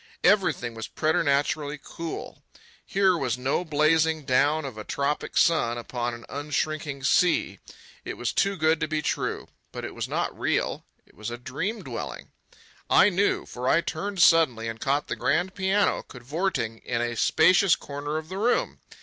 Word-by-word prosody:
Everything 185 - +2
was 115 -1 -6
preternaturally 150 -2 0
cool. 165 -1 -7 0.4
Here 190 -2 +2
was 125 -8 -1
no 135 +7 0
blazing 155 0 +2
down 145 +4 +2
of 130 -5 -6
a 110 - -7
tropic 140 +5 -2
sun 140 -8 +3
upon 120 0 -3
an 120 - -12
unshrinking 145 0 -3
sea. 175 +5 +2 0.4
It - - -5
was - - -2
too 200 -1 +1
good 160 0 +2
to - - -1
be 155 -1 -2
true. - - -2 0.2
But - - -6
it - - -7
was - - -4
not - - -2
real. - - -1 0.2
It - - -25
was 110 +2 -6
a 120 - -5
dream 185 - -4
dwelling. - - -6 0.6
I - - +6
knew, 200 +2 +1
for 125 +1 -3
I 165 - +4
turned 185 +3 -1
suddenly 130 -9 +4
and 115 0 -5
caught 140 +2 +1
the - - -3
grand 185 +2 0
piano 195 +1 +1
cavorting 125 - -3
in 120 -1 -3
a 120 0 -1
spacious 185 - +4
corner 145 +2 -5
of 155 0 -5
the 190 +3 -5
room. 235 +4 +1
150 Hz, 165 wpm, -26 LUFS, 125-170 Hz, 0.6 s, I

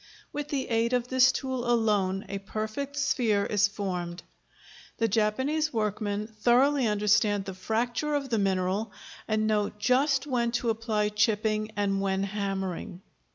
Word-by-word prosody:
With 295 0 -3
the 285 -3 -2
aid 230 +1 +1
of 245 0 0
this 260 0 +5
tool 260 -3 -3
alone 205 -5 +1
a 200 - -4
perfect 215 +8 -4
sphere 240 -8 +1
is 205 -1 +2
formed. 180 -4 -4 0.7
The 225 - +2
Japanese 260 +9 +1
workmen 210 -2 -1
thoroughly 245 +5 +2
understand 205 -1 +2
the 190 - -5
fracture 235 +9 -1
of 275 -2 -2
the 225 -2 +1
mineral, 195 +2 0 0.3
and 215 0 +1
know 210 -1 +1
just 260 +5 +1
when 240 -4 0
to 240 -1 +1
apply 220 -2 -1
chipping 215 0 +1
and 195 -1 0
when 195 0 0
hammering. 195 -2 -4
215 Hz, 145 wpm, -28 LUFS, 200-245 Hz, 0.7 s, this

